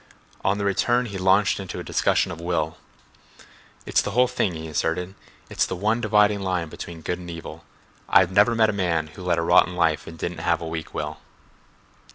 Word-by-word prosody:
On 95 +1 +1
the 100 - -2
return 120 +5 +2
he 100 -4 -6
launched 95 +2 +3
into 95 -2 -6
a - - -5
discussion - - +1
of 85 0 -7
will. 80 -2 -1 1.1
"It's - - +2
the - - -3
whole 125 0 +5
thing," 115 -8 -1
he 80 0 -6
asserted. 80 +4 -2 0.3
"It's - - 0
the - - -3
one 110 +6 0
dividing 105 -2 +3
line 90 -4 -2
between 85 +1 -8
good 90 +2 -2
and 90 -1 -9
evil. 85 -1 -8 0.5
I've 95 -1 +5
never 105 +5 +4
met 110 -1 +4
a - - -8
man 85 -5 0
who 80 - -12
led 90 -2 0
a 85 - 0
rotten 90 +2 +4
life 80 -3 +1
and 80 - -9
didn't 85 +1 -4
have 85 0 +1
a 85 - -6
weak 80 -1 -6
will." - - -4
90 Hz, 205 wpm, -24 LUFS, 85-100 Hz, 1.1 s, whole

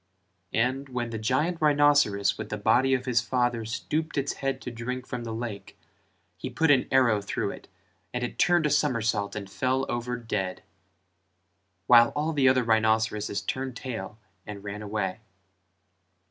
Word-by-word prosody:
and 130 +4 0
when 120 -2 -3
the 110 - -4
giant 150 +10 0
rhinceros 145 -10 +4
with - - -7
the 105 - -3
body 125 +6 +3
of 125 - -4
his 120 -3 +2
father 120 -2 0
stooped 155 +8 -3
its 140 0 0
head 135 -1 -1
to 125 - -6
drink 125 +2 -5
from 125 -2 -5
the 115 - -4
lake, 110 -3 -6 0.6
he - - -5
put 160 -2 +2
an 135 -3 +3
arrow 120 -6 +3
through 100 - -2
it - - -11 0.4
and 125 0 -3
it 120 - -5
turned 175 -2 +4
a 150 - +1
somersault 115 -8 +1
and 100 -2 -5
fell 130 +6 0
over 120 +1 -2
dead: 100 -6 -3 1.2
while 120 +1 +7
all 155 +2 0
the 135 -3 +4
other 130 -1 +3
rhinceroses 110 -2 +1
turned 130 -1 -3
tail 110 -5 -6 0.3
and 100 -1 -7
ran 105 +1 -6
away. 105 -3 -3
120 Hz, 160 wpm, -27 LUFS, 110-135 Hz, 1.2 s, while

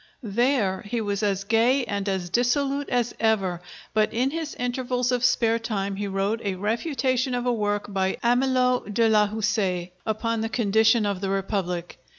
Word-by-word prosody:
There 220 -3 +1
he 230 +3 -3
was 205 -1 -2
as 200 -2 0
gay 235 +5 +2
and 200 -2 -2
as 185 -3 -3
dissolute 275 +5 +1
as 245 -1 0
ever, 195 -6 +1 0.3
but 215 0 +2
in 255 +4 0
his 320 -1 -4
intervals 250 0 -1
of 250 -1 0
spare 230 -2 +3
time 200 -3 -3
he 205 0 -2
wrote 195 +3 -1
a 200 -2 -2
refutation 255 - -1
of 245 0 -2
a 245 - +2
work 205 -2 -1
by 190 -1 0
Amelot 250 -3 +2
de 230 0 +4
la 210 -1 +4
Houssaye 195 -4 -1
upon 225 +1 -1
the 225 - -2
condition 220 0 +3
of 200 -2 -2
the 195 - -2
Republic. 190 -4 -2
220 Hz, 170 wpm, -25 LUFS, 200-245 Hz, 0.3 s, de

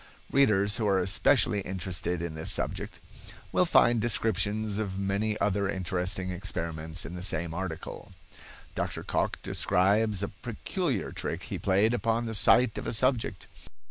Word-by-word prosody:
Readers 105 -7 +3
who 110 - 0
are 100 -1 +3
especially 100 +4 +3
interested 90 -2 -3
in 85 -2 -4
this 80 0 -2
subject - - -1 0.5
will - - +3
find 120 -2 +4
descriptions 110 -1 +1
of 95 -3 -3
many 100 +2 -1
other 100 -1 +1
interesting 95 0 -1
experiments 85 -3 -3
in 85 - -7
the 90 - -6
same 85 -2 -2
article. 90 -2 -6 0.6
Dr. - - -3
Cocke - - -1
describes 100 +2 +2
a 100 - -2
peculiar 120 - -3
trick - - -4
he - - -5
played 100 +4 +2
upon 115 0 0
the 115 - -4
sight 110 +2 +4
of - - -6
a - - -1
subject. 115 - 0
100 Hz, 145 wpm, -28 LUFS, 90-110 Hz, 0.6 s, find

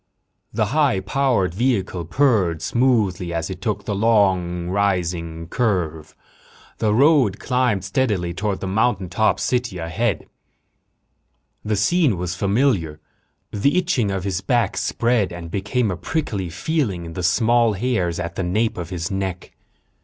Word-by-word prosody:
The 110 0 0
high 145 -10 +3
powered 100 -3 0
vehicle 95 -6 -1
purred 95 - +1
smoothly 110 -8 +1
as 85 -1 -3
it - - -7
took - - -3
a - - -1
long, 95 -5 +2
rising 90 -4 -1
curve. 85 - -1 0.6
The 110 - +2
road 130 -4 +4
climbed 125 -7 0
steadily 95 -5 0
toward 100 +2 -2
the 95 - -3
mountaintop 105 0 +1
city 125 -6 -1
ahead. 85 +3 -2 1.4
The 105 0 0
scene 125 - +2
was 90 0 -3
familiar. 100 - +1 0.5
The 140 - +1
itching 165 - +1
of 95 -2 -2
his 95 -1 -2
back 115 -7 +1
spread 115 -2 0
and 85 -1 -8
became 105 +3 0
a - - -2
prickly 105 - -3
feeling 100 - -2
in 80 - -8
the 90 - -4
small 115 +5 +3
hairs 95 -6 -1
at 85 -1 -4
the 95 - -3
nape 105 +4 0
of 85 -2 -5
his 90 +1 -4
neck. 95 -2 -4
100 Hz, 140 wpm, -21 LUFS, 90-120 Hz, 1.4 s, road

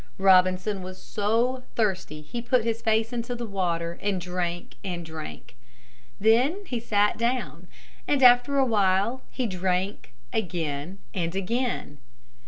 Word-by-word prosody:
Robinson 185 +1 +4
was 185 0 -8
so 230 +5 0
thirsty 185 -8 -1
he 235 +10 -5
put 245 0 +2
his 230 0 -1
face 220 +1 +1
into 240 +1 -3
the 240 0 -4
water 170 -4 -2
and 200 -2 0
drank 175 -1 -3
and 175 -3 -4
drank. 160 -6 -8 0.6
Then 250 - +3
he 250 -9 -3
sat 210 -2 +1
down, 240 +2 -1 0.4
and 280 -2 +2
after 245 +3 +6
a 270 - +5
while 205 +2 +2
he 255 - -2
drank 185 - -2 0.2
again 165 -4 -2 0.2
and 170 -2 -2
again. 195 - -2
205 Hz, 135 wpm, -26 LUFS, 180-235 Hz, 0.6 s, after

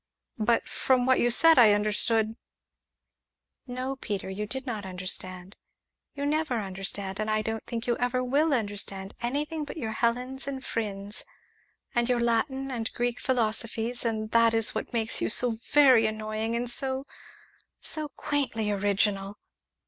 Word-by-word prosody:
"But 230 +2 +1
from 255 -2 +1
what 260 0 +3
you 240 - +3
said 325 +4 +8
I 220 -4 +7
understood 215 +1 +2 0.7
" - - -57 0.5
"No, 255 +2 -4
Peter, 200 -6 -4
you 210 +2 -4
did 265 +4 -5
not 220 -5 -4
understand; 185 0 -5 0.6
you 285 0 -3
never 295 -4 0
understand, 195 0 -3
and 215 0 -2
I 215 0 +1
don't 225 0 -3
think 230 0 -4
you 240 - +1
ever 250 +1 0
will 290 +5 +1
understand 200 -5 -1
anything 295 +6 -2
but 295 - -8
your 225 -7 -3
Helens 250 +4 0
and 270 -1 -5
Phrynes 205 -2 0 0.7
and 240 0 +1
your 245 -1 +2
Latin 265 +4 0
and 230 -3 -3
Greek 240 0 -2
philosophies, 230 -1 0
and 220 -2 -2
that 230 0 +4
is 225 -1 +2
what - - -4
makes 225 -2 0
you - - 0
so 235 0 +1
very 260 -6 +6
annoying, 215 +1 -3
and 240 +1 -2
so 265 +2 +1 0.7
so 310 -1 -2
quaintly 255 -9 -2
original!" 200 0 0
230 Hz, 155 wpm, -27 LUFS, 215-255 Hz, 0.7 s, said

